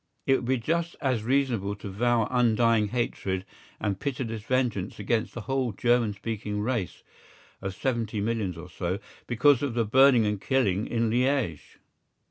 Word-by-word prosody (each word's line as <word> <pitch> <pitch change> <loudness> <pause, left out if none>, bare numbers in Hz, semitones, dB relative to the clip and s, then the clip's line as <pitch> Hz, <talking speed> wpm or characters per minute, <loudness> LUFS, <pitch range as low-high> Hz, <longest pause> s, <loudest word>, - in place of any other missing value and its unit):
It 135 - +4
would - - -6
be 130 +2 +2
just 165 +8 -1
as 130 -6 0
reasonable 120 -6 +1
to 100 - -9
vow 115 +2 +2
undying 115 -3 +3
hatred 100 -5 -2 0.3
and 100 -2 -2
pitiless 120 -5 -3
vengeance 115 -5 -1
against 110 +2 -1
the 120 - -4
whole 130 -1 -1
German 120 0 +2
speaking 105 0 -4
race 110 -4 -2 0.6
(of 95 -1 -4
seventy 115 -4 -1
millions 105 -4 -1
or 85 +2 -8
so) 90 +1 -3 0.3
because 125 +2 +4
of 140 -5 -2
the 115 -1 +2
burning 130 0 +5
and 105 -2 -1
killing 110 -7 +1
in 115 -1 0
Liège. 125 - 0
115 Hz, 155 wpm, -27 LUFS, 105-130 Hz, 0.6 s, burning